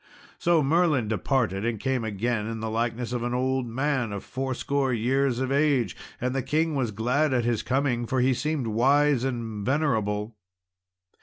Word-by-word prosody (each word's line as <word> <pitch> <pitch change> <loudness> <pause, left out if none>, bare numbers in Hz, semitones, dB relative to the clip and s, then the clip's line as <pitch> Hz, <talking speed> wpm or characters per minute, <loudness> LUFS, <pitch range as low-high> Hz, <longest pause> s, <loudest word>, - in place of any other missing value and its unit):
So 170 -3 +3
Merlin 150 -5 +2
departed, 110 -3 0
and 115 -2 -1
came 130 0 -1
again 110 +1 -1
in 115 0 -4
the 110 0 -3
likeness 120 +1 -2
of 120 - -1
an 120 +1 -1
old 130 0 0
man 130 -1 -1
of 100 -1 -5
fourscore 135 +1 -1
years 125 +2 +1
of 130 0 -1
age; 140 - +2 0.2
and 125 +1 -1
the 135 - 0
king 160 +4 0
was 130 -5 0
glad 125 +7 +1
at 120 -2 +1
his 120 -2 +1
coming, 125 -1 0
for 130 - 0
he 130 +1 +3
seemed 150 0 -1
wise 135 +4 +3
and 115 -5 -3
venerable. 110 -6 0
125 Hz, 170 wpm, -26 LUFS, 115-135 Hz, 0.2 s, So